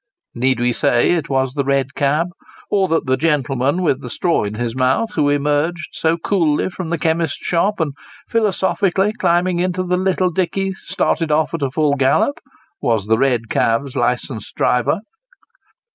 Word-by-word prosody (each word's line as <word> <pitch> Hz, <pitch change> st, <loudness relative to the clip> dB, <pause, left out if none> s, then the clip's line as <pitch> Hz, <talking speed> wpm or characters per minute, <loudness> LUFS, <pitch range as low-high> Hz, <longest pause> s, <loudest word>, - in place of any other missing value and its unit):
Need 130 Hz, +1 st, +1 dB
we 120 Hz, 0 st, +1 dB
say 120 Hz, -, +2 dB
it 165 Hz, -2 st, -1 dB
was 130 Hz, -2 st, 0 dB
the 140 Hz, -1 st, -1 dB
red 140 Hz, 0 st, 0 dB
cab; 150 Hz, +5 st, +1 dB, 0.4 s
or 195 Hz, -2 st, +2 dB
that 165 Hz, -1 st, 0 dB
the 130 Hz, 0 st, +2 dB
gentleman 145 Hz, +1 st, 0 dB
with 140 Hz, -5 st, +1 dB
the 125 Hz, -, -7 dB
straw 170 Hz, +4 st, 0 dB
in 105 Hz, +1 st, -4 dB
his 120 Hz, +1 st, -3 dB
mouth, 130 Hz, -, +1 dB
who 145 Hz, -2 st, +2 dB
emerged 145 Hz, +4 st, 0 dB
so 165 Hz, +1 st, 0 dB
coolly 165 Hz, -2 st, 0 dB
from 180 Hz, -2 st, -6 dB
the 170 Hz, -, 0 dB
chemist's 160 Hz, -1 st, 0 dB
shop 195 Hz, +4 st, +1 dB
and 155 Hz, -4 st, -1 dB, 0.3 s
philosophically 200 Hz, -2 st, +1 dB
climbing 175 Hz, -1 st, +1 dB
into 185 Hz, +1 st, 0 dB
the 180 Hz, 0 st, 0 dB
little 185 Hz, -1 st, +1 dB
dickey, 190 Hz, +2 st, -1 dB
started 165 Hz, -3 st, -1 dB
off 155 Hz, +2 st, +1 dB
at 165 Hz, -, -3 dB
full 150 Hz, 0 st, +1 dB
gallop, 135 Hz, -, +2 dB, 0.4 s
was 110 Hz, -4 st, +1 dB
the 110 Hz, +1 st, +2 dB
red 125 Hz, -4 st, +1 dB
cab's 125 Hz, +6 st, 0 dB
licensed 120 Hz, -2 st, -2 dB
driver 125 Hz, -, +1 dB
155 Hz, 165 wpm, -19 LUFS, 130-180 Hz, 0.4 s, say